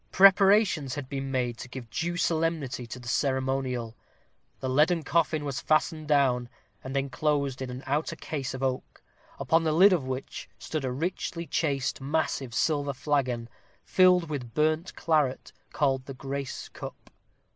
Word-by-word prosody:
Preparations 195 - +5
had 145 -3 -5
been 135 0 -4
made 125 -3 -1
to 125 - -8
give 125 -1 -8
due 175 +1 -2
solemnity 160 -7 -1
to 120 - -7
the 125 -1 -11
ceremonial. 130 -3 -1 0.6
The 130 - -3
leaden 155 +6 +3
coffin 155 -2 +1
was 135 -2 -3
fastened 155 0 +1
down, 130 -5 +2 0.3
and 135 +1 -3
enclosed 140 0 0
in 130 - -4
an 125 +2 -7
outer 145 +4 -1
case 135 -4 -4
of 130 - -5
oak, 130 -1 -3 0.3
upon 165 +1 +2
the 160 - +1
lid 185 +5 +7
of 170 -6 +1
which 130 +1 -5
stood 155 -4 -4
a 130 - -1
richly 170 +4 -3
chased 140 -5 -1
massive 140 -3 -1
silver 145 -3 +1
flagon, 130 -4 -1 0.4
filled 180 -2 +5
with 125 -7 -5
burnt 155 +4 +1
claret, 150 -5 0 0.2
called 135 -3 0
the 135 - -7
grace 135 0 -5
cup. - - -10
140 Hz, 155 wpm, -28 LUFS, 130-160 Hz, 0.6 s, lid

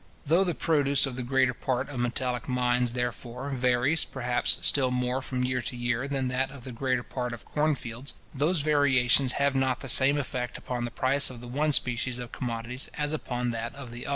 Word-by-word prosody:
Though 165 +6 +4
the 175 -4 -1
produce 140 -3 +3
of 135 -2 -5
the 125 - -4
greater 130 0 +2
part 130 +1 -2
of 130 -4 -5
metallic 125 0 -2
mines, 125 -1 +1
therefore, 125 +2 -4
varies, 125 +4 +2
perhaps, 125 -2 0
still 135 -3 +3
more 125 +1 -1
from 130 -1 -2
year 125 0 0
to 125 +2 -5
year 120 +2 -1
than 135 -2 -1
that 130 +1 0
of 135 -2 -11
the 130 - -6
greater 125 +1 -1
part 125 -1 -4
of 110 -4 -9
corn 150 0 +1
fields, 120 +2 -5 0.2
those 155 +4 +2
variations 140 -3 +3
have 140 0 +1
not 130 -1 0
the 135 - -6
same 135 +3 +6
effect 130 -3 -3
upon 120 -1 -4
the - - -3
price 135 +4 +1
of 125 -2 -9
the 120 - -9
one 150 +5 0
species 125 -2 +1
of 120 -2 -7
commodities 120 +1 -3
as 150 0 0
upon 125 -5 -2
that 115 +2 -4
of 135 -4 -8
the 120 +3 -7
other. - - -3
125 Hz, 210 wpm, -28 LUFS, 120-140 Hz, 0.2 s, same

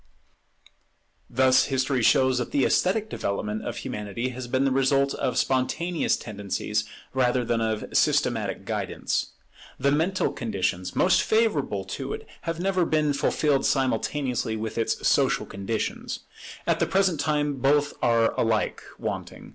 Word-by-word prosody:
Thus 130 +1 +4
history 130 -1 0
shows 130 +2 +4
that 125 - -3
the 140 - +2
esthetic 205 +4 +2
development 105 - -3
of - - -4
Humanity 105 +4 -4
has 130 0 -6
been 130 +2 +1
the 135 - +2
result 135 +1 +2
of 130 -2 -2
spontaneous 155 +6 +1
tendencies 105 0 -3 0.3
rather 125 -1 +2
than 115 0 0
of 110 -1 -1
systematic - - +1
guidance. - - -2 0.5
The 140 +2 +2
mental 165 +6 +1
conditions 95 -5 -2
most 180 - +4
favourable 180 - +1
to 95 - -5
it - - -7 0.2
have 165 0 -3
never 185 0 +1
been 155 -3 +1
fulfilled 140 0 +1
simultaneously 130 -3 0
with 110 0 -4
its 115 - 0
social - - +2
conditions. 100 +3 -4 0.4
At - - +1
the - - +2
present 190 -5 +2
time 150 -2 0
both 145 +2 +2
are 115 -1 +3
alike 110 -2 +1 0.2
wanting. - - -5
130 Hz, 140 wpm, -26 LUFS, 115-150 Hz, 0.5 s, Thus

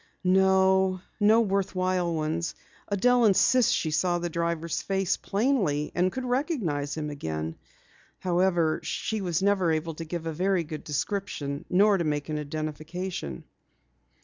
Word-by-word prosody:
"No 190 0 +3 0.2
worthwhile 195 -4 +2
ones. 160 +2 -2 0.4
Adelle 245 +5 +3
insists 230 +4 +4
that - - +3
she 160 - -1
saw 175 +3 +1
the 175 0 -3
driver's 170 0 -2
face 195 -2 0
plainly 195 - 0
and 180 +1 +1
could 260 +4 -4
recognize 235 - -1
him 150 -1 -3
again. 80 - -4 0.6
However, 175 -3 +1
she 220 - -3
never 190 +1 +1
was 160 - +3
able 160 +1 -3
to 165 - -6
give 165 0 -5
a 165 - -2
very 185 +2 +1
good 155 -1 -7
description, 150 -2 -3
nor 200 +2 +4
to - - +1
make 150 -1 -2
an 155 -1 -2
identification." 155 - -5
175 Hz, 140 wpm, -27 LUFS, 155-195 Hz, 0.6 s, insists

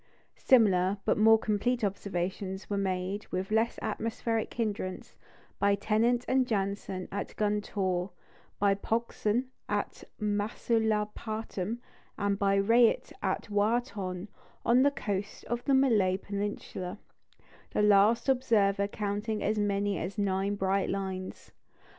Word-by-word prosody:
Similar, 200 -6 +4
but - - +3
more 225 +1 +7
complete 225 +3 0
observations 190 0 -3
were - - +1
made, 190 +1 -2
with 190 +2 -3
less 225 +2 +2
atmospheric 225 0 -2
hindrance, 205 -5 -3 0.4
by 200 0 +3
Tennant 225 +4 +1
and 260 -1 +2
Janssen 195 -3 -2
at 200 - -4
Guntoor, 200 -3 -1 0.5
by 200 -1 +3
Pogson 230 +3 -1 0.2
at - - -2 0.2
Masulipatam, 215 0 -1 0.4
and 200 0 0
by 195 0 +3
Rayet 230 +4 +3
at - - -2
Wha 210 +4 +3
Tonne, 190 -5 -6 0.4
on 245 +2 +5
the 285 - +5
coast 205 -7 -4
of 240 +1 -3
the 275 - +4
Malay 215 -9 +3
peninsula, 200 -1 -4 0.7
the 210 - 0
last 210 +4 +5
observer 215 -7 +2
counting 210 +1 -3
as 215 +1 +1
many 200 -1 0
as 190 +5 -5
nine 200 0 0
bright 195 0 0
lines. 190 -1 -4
205 Hz, 120 wpm, -30 LUFS, 195-225 Hz, 0.7 s, more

